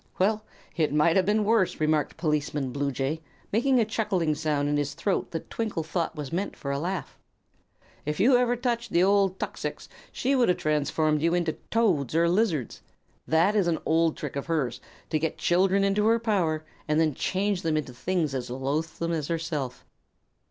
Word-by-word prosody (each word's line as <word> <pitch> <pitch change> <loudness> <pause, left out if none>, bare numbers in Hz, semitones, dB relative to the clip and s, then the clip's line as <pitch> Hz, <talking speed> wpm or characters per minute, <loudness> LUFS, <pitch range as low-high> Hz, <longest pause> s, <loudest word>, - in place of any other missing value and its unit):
"Well, 210 +3 +2 0.3
it 155 -4 +1
might 150 +3 +3
have 190 -1 +3
been 210 +1 +3
worse," 215 -3 +2
remarked 155 -1 +1
Policeman 150 -4 -1
Bluejay, 140 +2 -2 0.3
making 250 +4 +3
a 225 - +3
chuckling 205 -7 0
sound 150 -2 0
in 145 - +1
his 145 -1 -2
throat 200 - -1
that 165 - -6
Twinkle 215 -8 -2
thought 165 +1 -2
was 150 -2 -6
meant 190 +4 -2
for 140 - -4
a 140 - -1
laugh. 180 +4 -4 0.8
"If 150 +1 -3
you 230 +8 +5
had 245 - +6
ever 245 0 +2
touched 240 -1 -2
the 175 - +4
old 195 -1 +3
tuxix - - -5 0.2
she 270 +2 0
would 250 -5 +3
have 180 - +3
transformed 155 0 +1
you 165 +2 +2
into 170 -3 0 0.2
toads 175 - +1
or 170 +1 +4
lizards. 175 - 0 0.5
That 165 +7 +3
is 200 -4 +3
an 165 -2 +1
old 165 0 +2
trick 150 -5 -5
of 140 - -4
hers, 140 -8 -1 0.3
to 155 - +2
get 160 +1 -2
children 190 +3 +3
into 200 +2 +2
her 230 +1 +5
power 180 -9 0 0.2
and 155 +1 +2
then 160 -2 +2
change 195 +5 -1
them 160 -2 0
into 140 -4 -3
things 165 +2 -1
as 125 -2 -3
loathsome 155 +6 -2
as 155 -4 -2
herself." 160 -6 -3
165 Hz, 185 wpm, -27 LUFS, 150-200 Hz, 0.8 s, had